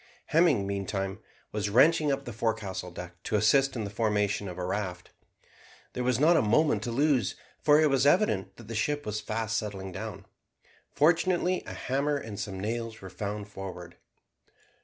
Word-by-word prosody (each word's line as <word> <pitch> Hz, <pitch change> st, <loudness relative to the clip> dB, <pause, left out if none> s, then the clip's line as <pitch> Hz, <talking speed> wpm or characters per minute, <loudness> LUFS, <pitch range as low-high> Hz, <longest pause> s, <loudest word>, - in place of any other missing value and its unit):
Hemming, 155 Hz, -, +4 dB
meantime, 95 Hz, 0 st, -3 dB, 0.3 s
was 105 Hz, -1 st, -1 dB
wrenching 150 Hz, +6 st, +5 dB
up 140 Hz, 0 st, -2 dB
the 120 Hz, -, -6 dB
forecastle 110 Hz, -5 st, -2 dB
deck 90 Hz, 0 st, -9 dB
to 110 Hz, -, -2 dB
assist 135 Hz, +6 st, +3 dB
in 115 Hz, -, -2 dB
the 100 Hz, -, -5 dB
formation 105 Hz, -2 st, 0 dB
of 90 Hz, -1 st, -7 dB
a 90 Hz, -, -3 dB
raft. 90 Hz, -2 st, -4 dB, 0.8 s
There 125 Hz, -, -2 dB
was 125 Hz, -1 st, +1 dB
not 165 Hz, +4 st, +5 dB
a -, -, +5 dB
moment 120 Hz, +1 st, +3 dB
to 120 Hz, -, -2 dB
lose, 135 Hz, -4 st, +2 dB, 0.3 s
for 150 Hz, 0 st, +5 dB
it 155 Hz, -, +5 dB
was 135 Hz, +1 st, +3 dB
evident 100 Hz, -, +2 dB
that 115 Hz, -, -12 dB
the 115 Hz, -, -6 dB
ship 145 Hz, +6 st, -1 dB
was 105 Hz, 0 st, -3 dB
fast 115 Hz, 0 st, -1 dB
settling 95 Hz, -3 st, -6 dB
down. -, -, -7 dB, 0.6 s
Fortunately 175 Hz, +3 st, +2 dB
a -, -, -6 dB
hammer 140 Hz, +3 st, 0 dB
and 110 Hz, -7 st, -7 dB
some 100 Hz, -2 st, -4 dB
nails 115 Hz, +2 st, -3 dB
were 95 Hz, -1 st, -10 dB
found 105 Hz, +1 st, -4 dB
forward. 90 Hz, -4 st, -8 dB
110 Hz, 175 wpm, -29 LUFS, 100-140 Hz, 0.8 s, wrenching